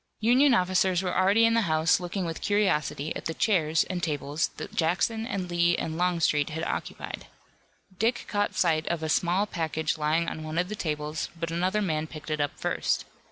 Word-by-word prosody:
Union 250 +4 +5
officers 185 -1 +2
were 180 - -2
already 200 +5 +4
in 230 - +3
the 230 - +3
house 155 +1 +3
looking 180 +1 -3
with 165 -1 -5
curiosity 175 -7 0
at - - -6
the 165 - -3
chairs 160 -7 +2
and 180 -2 -4
tables 150 -1 -1
that - - -7
Jackson 220 +7 0
and 195 -7 -3
Lee 175 0 +2
and 160 - -3
Longstreet 165 -4 +1
had 160 +1 -4
occupied. - - -5 0.7
Dick 230 +3 +1
caught 205 -1 -1
sight 160 -3 +2
of 170 -2 -2
a 160 - -2
small 180 +5 +2
package 160 -4 -2
lying 155 +3 +1
on 160 - -4
one 155 +1 -5
of 180 +1 +1
the 215 - -4
tables, 150 -3 -3
but 165 0 -3
another 185 +5 0
man 155 -4 -1
picked 155 0 -8
it 155 -1 0
up 145 - -2
first. - - -1
170 Hz, 195 wpm, -27 LUFS, 155-190 Hz, 0.7 s, Union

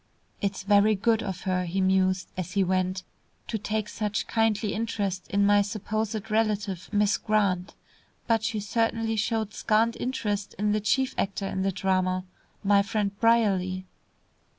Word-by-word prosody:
"It's 200 -1 -2
very 205 +2 +4
good 225 +3 +2
of 190 -4 -4
her," 185 -1 0
he 180 +3 -2
mused, 185 0 +2
as 180 -1 -4
he 200 - +3
went, 185 0 0 0.4
"to 220 - -2
take 215 +1 -2
such 210 -2 -2
kindly 220 -2 +1
interest 200 -4 -2
in 200 0 +2
my 205 0 +5
supposed 215 +1 -3
relative, 210 -4 0
Miss 210 +1 +2
Grant. 200 -4 0 0.5
But 225 -2 +2
she 220 -1 -1
certainly 225 +1 0
showed 220 0 -1
scant 225 +1 +2
interest 210 -5 -2
in 210 +1 +1
the 210 0 +1
chief 260 +5 +1
actor 195 0 -1
in 190 -1 -2
the 195 +1 +1
drama, 185 -1 0 0.4
my 200 0 +5
friend 200 0 -1
Brierly." 195 -5 +2
205 Hz, 150 wpm, -27 LUFS, 190-220 Hz, 0.5 s, my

